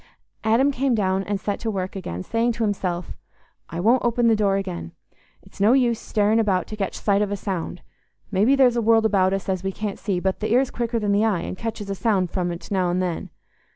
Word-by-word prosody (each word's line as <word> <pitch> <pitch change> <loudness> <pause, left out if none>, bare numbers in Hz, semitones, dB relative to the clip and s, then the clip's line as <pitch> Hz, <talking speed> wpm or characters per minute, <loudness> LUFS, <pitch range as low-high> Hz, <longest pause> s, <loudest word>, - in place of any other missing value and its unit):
Adam 235 +6 +3
came 270 -1 +1
down 190 -2 +1
and 205 -1 -2
set 200 +1 -3
to 225 - -3
work 190 -3 -3
again, 90 - -5
saying 230 - 0
to 235 0 -2
himself, 180 -4 -2 0.6
"I 165 - -5
won't 230 +7 +3
open 240 0 +1
the 225 -1 +5
door 200 -2 +2
again. 85 - -5 0.5
It's - - -12
no 215 +4 +5
use 245 -4 +2
staring 215 +1 +1
about 195 -4 +1
to 215 - -5
catch 195 -3 -3
sight 200 -1 +1
of 210 - 0
a 205 - -1
sound. 180 -3 -4 0.5
Maybe 215 +8 +4
there's 255 -3 +4
a 235 - +1
world 225 0 +4
about 190 -3 +3
us 195 0 -2
as 190 -1 -1
we 195 - -1
can't 205 0 -5
see, 195 -3 -1
but 190 +1 -1
th' 215 - -3
ear's 245 +4 +2
quicker 235 -1 -2
than 210 -2 0
the 205 +2 +3
eye 205 -6 +1
and - - -5
catches 220 0 -5
a - - 0
sound 195 -3 0
from't 175 -1 -3
now 185 -3 +1
and 175 +1 0
then. 180 -3 -2
205 Hz, 230 wpm, -23 LUFS, 190-230 Hz, 0.6 s, the